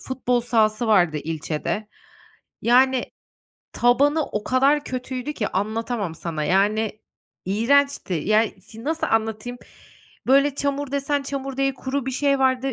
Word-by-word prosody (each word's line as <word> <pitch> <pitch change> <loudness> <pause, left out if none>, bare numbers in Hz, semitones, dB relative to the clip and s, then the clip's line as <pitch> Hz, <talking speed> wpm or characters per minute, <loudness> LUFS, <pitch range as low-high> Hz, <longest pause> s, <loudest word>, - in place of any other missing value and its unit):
futbol 250 -2 -1
sahası 225 -1 +1
vardı 180 -8 +3
ilçede. 160 +7 -3 0.7
Yani, 255 +1 +4 0.7
tabanı 285 +6 +3
o 210 - -4
kadar 275 +3 +2
kötüydü 255 +2 -4
ki 215 -8 -2
anlatamam 215 -2 -2
sana, 160 -2 -4
yani, 210 +5 +1 0.4
iğrençti. 235 +3 +2
Yani, 210 +4 +1
şi 225 +4 -12
nasıl 320 +2 -1
anlatayım? 225 +2 -1 0.7
Böyle 275 +2 +4
çamur 280 -1 -2
desen 280 0 0
çamur 275 -1 -5
değil 275 -1 +1
kuru 265 0 -3
bir - - -1
şey 275 +2 +1
vardı, 265 0 +1
245 Hz, 125 wpm, -23 LUFS, 215-275 Hz, 0.7 s, Yani